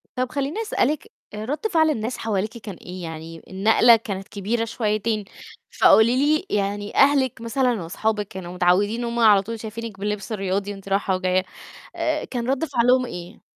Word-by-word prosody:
طَب 255 0 -1
خليني 285 +9 -2
أسألِك، 420 -2 -1 0.2
آآ، 215 +1 -5
رد 300 - -2
فعل 320 -2 +4
الناس 230 -3 -2
حواليكِ 215 +2 -2
كان 210 -4 -8
إيه؟ 180 +1 -9
يعني 160 0 -8
النقلة 220 +5 +5
كانت 195 -3 -5
كبيرة 220 +3 -2
شويتين، 215 -1 -1 0.6
فقولي 230 +3 +6
لي 305 +6 +2
يعني 205 0 -2
أهلِك 270 -4 +3
مثلًا، 240 -2 0
وأصحابِك 210 +4 -1
كانوا 180 -2 -8
متعودين 185 +6 +2
إن 240 - -2
هم 235 0 -2
على 210 -4 +6
طول 225 +3 -6
شايفينِك 220 -2 -7
باللبس 210 +1 -3
الرياضي، 195 0 -2
وأنتِ 195 0 -11
راحة 195 -1 +1
وجاية، 185 0 +1 0.5
آآ، - - -1
كان 245 -1 -4
رد 275 +4 +1
فعلهم 250 -2 +3
إيه؟ 175 -6 -9
220 Hz, 170 wpm, -23 LUFS, 195-245 Hz, 0.6 s, فقولي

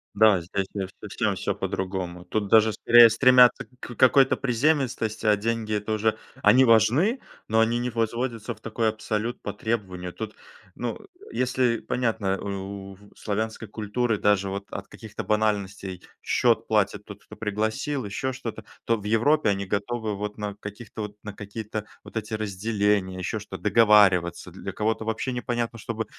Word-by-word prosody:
Да, 105 -3 +5
здесь, 95 +3 -3
конечно, 95 -1 -5
совсем 105 0 -1
всё - - -2
по-другому. 90 -2 -4
Тут 105 +3 -2
даже 110 0 +5
скорее 120 -1 +7
стремятся 125 +1 +6
к 120 - -8
какой-то 135 +1 +5
приземистости, 125 -4 0
а 105 - +6
деньги- 110 0 -2
это 105 +1 -2
уже 110 +1 +1 0.2
они 130 +1 +6
важны, 130 - +4 0.3
но 110 +1 +2
они 115 +1 +3
не 120 +1 -1
возводятся 115 0 -2
в 110 - -23
такой 115 0 0
абсолют 110 +2 -3
по 100 - -5
требованию. 95 -5 -3
Тут, 110 +3 -7 0.4
ну, 120 -2 -3 0.3
если 125 -2 +1
понятно, 110 -6 -1
у 100 -1 -4 0.2
у 95 - -12 0.2
славянской 110 +1 -3
культуры 110 +2 -1
даже 100 -1 +2
вот 100 +1 -5
от 100 - -6
каких-то 110 -2 -8
банальностей: 100 -3 -1 0.2
счет - - +2
платит - - +1
тот, - - -11
кто - - -13
пригласил, 110 +6 -2
еще 115 +6 -2
что-то- 125 -3 -6 0.2
то 115 - +3
в 105 - -10
Европе 115 +6 +3
они 100 -1 0
готовы 110 +2 -2
вот 105 +1 -5
на 105 -1 -4
каких-то 105 +1 -8
вот 105 0 -7
на 105 - -6
какие-то 105 +1 -6 0.2
вот - - -14
эти 110 +1 -4
разделения, 105 -2 0
еще 90 - -2
что, - - -8
договариваться. 100 -6 +4
Для - - -7
кого-то 110 +1 -1
вообще 115 +4 -2
непонятно, 120 -1 -2
чтобы 110 0 -4
110 Hz, 160 wpm, -25 LUFS, 100-115 Hz, 0.4 s, скорее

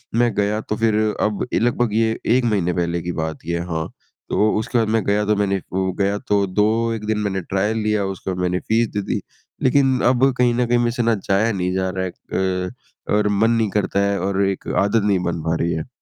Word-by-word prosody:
मैं 120 0 +3
गया, 105 +1 +1
तो 105 - -3
फिर 110 -1 +2 0.3
अब 105 +1 0
ए - - +3
लगभग 120 -2 +1
ये 110 0 +1 0.2
1 130 -1 +2
महीने 95 -6 +1
पहले 85 0 -1
की 90 - -3
बात 80 0 -4
ये 85 0 -1
है, 85 - -4
हाँ। 80 -2 -3 0.4
तो 105 +1 +2
उसके 120 +2 -1
बाद 110 -2 +2
मैं 110 - 0
गया, 105 +1 +1
तो 105 0 +2
मैंने 100 -2 0
वो 95 0 0
गया, 100 +1 +1
तो 105 -4 +1
2, 110 +4 +1
1 105 -1 -5
दिन 110 -1 0
मैंने 95 -2 -1
ट्रायल 100 +5 -1
लिया, 105 -2 +1
उसके 95 0 -4
बाद 90 - -4
मैंने 90 0 0
फ़ीस 115 +1 +1
दे 105 - -1
दी। - - -1 0.4
लेकिन 130 -1 +3
अब 130 +2 +3
कहीं 125 -1 +3
न 125 0 +2
कहीं, 120 0 +3
मेरे 120 0 +1
से 120 -1 -1
ना 115 -1 +3
जाया 110 +4 +3
नहीं 90 -2 -1
जा 95 0 0
रहा 95 0 -2
है 90 - -4 0.6
अ, - - -5 0.5
और 105 0 +2
मन 115 +1 +4
नहीं 115 -3 +1
करता 100 0 0
है 100 - 0
और 100 +1 0
एक 95 -1 -3 0.2
आदत 105 +1 +1
नहीं 100 -3 +2
बन 85 -2 -2
पा 80 0 0
रही 85 0 0
है। 80 +9 -4
105 Hz, 245 wpm, -21 LUFS, 95-115 Hz, 0.6 s, मन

